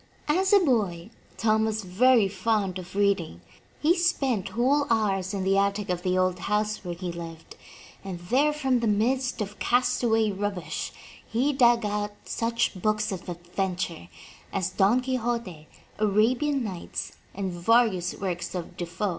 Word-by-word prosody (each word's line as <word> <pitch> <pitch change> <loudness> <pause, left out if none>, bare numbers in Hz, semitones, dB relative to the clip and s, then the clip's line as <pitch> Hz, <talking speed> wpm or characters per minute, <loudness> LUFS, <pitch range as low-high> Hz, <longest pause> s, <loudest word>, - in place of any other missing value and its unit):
As 370 +6 +2
a 410 - +8
boy 215 - 0 0.3
Tom 220 -1 +2
was 220 -1 -2
very 220 +4 +4
fond 195 -1 -1
of 185 +1 -10
reading. 195 - +1 0.4
He 325 +4 +4
spent 275 - 0
whole 280 +4 +3
hours 195 -5 +1
in 195 -2 -2
the 195 +1 +3
attic 200 -1 0
of 180 -1 -2
the 185 0 0
old 185 -1 +1
house 210 +2 -1
where 175 -2 -4
he 180 0 -4
lived, 165 -1 -9 0.5
and 190 -2 -5
there 260 +12 +2
from 270 -4 +1
the 235 - 0
midst 245 +4 +1
of 205 0 -5
castaway 240 -3 +2
rubbish, 195 -5 -3 0.4
he 260 +6 +1
dug 240 -4 +4
out 205 0 -2
such 230 +1 0
books 215 +1 +1
of 190 -2 -5
adven 175 +1 -3
ture 170 - -4 0.4
as 190 -3 -1
Don 210 +6 +3
Quixote, 235 -10 -3 0.3
Arabian 240 +7 +2
Nights, 185 -6 -5 0.2
and 190 -1 -2
various 185 0 +2
works 180 -2 -4
of 175 -2 -5
Defoe. 175 +4 -2
210 Hz, 155 wpm, -26 LUFS, 185-240 Hz, 0.5 s, a